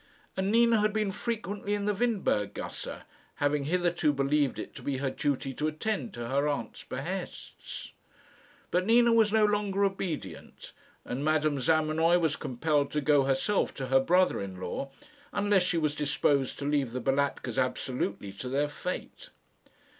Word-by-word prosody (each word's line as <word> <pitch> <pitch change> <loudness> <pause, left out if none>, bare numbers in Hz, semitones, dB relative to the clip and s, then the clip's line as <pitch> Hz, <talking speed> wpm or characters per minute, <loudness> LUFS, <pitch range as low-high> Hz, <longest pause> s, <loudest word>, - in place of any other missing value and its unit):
And 190 +1 0
Nina 230 -1 +5
had 210 0 +2
been 215 -2 0
frequently 205 -2 -3
in 205 -1 -3
the 210 - +2
Windberg 195 - 0
gasse, - - -6 0.3
having 145 0 0
hitherto 175 -1 +2
believed 140 0 +1
it - - -6
to - - -9
be 140 -2 -2
her 135 0 -1
duty 135 -2 -1
to 150 +4 -1
attend 210 +8 -2
to 120 -1 -5
her 140 +3 +1
aunt's 145 -1 -3
behests. - - -6 0.8
But 180 +1 +2
Nina 235 +1 +5
was 225 -2 +4
no 220 -1 +4
longer 205 -1 +1
obedient, 190 -5 -5 0.3
and 130 +3 -3
Madame 155 -2 +2
Zamenoy 160 +3 +3
was 160 -3 +1
compelled 145 +3 0
to 150 - +1
go 145 -1 +4
herself 135 +10 +1
to 130 -2 -5
her 135 0 +5
brother 180 - +3
in 95 -2 -6
law, 95 +9 -4 0.4
unless 205 -1 +3
she 180 -1 0
was 155 -2 +1
disposed 140 -2 +1
to 140 - -5
leave 140 -5 0
the 130 - -2
Balatkas 135 -3 0
absolutely 125 -6 -2
to 115 +6 -7
their 140 +3 +1
fate. 180 +5 -6
150 Hz, 160 wpm, -29 LUFS, 135-195 Hz, 0.8 s, Nina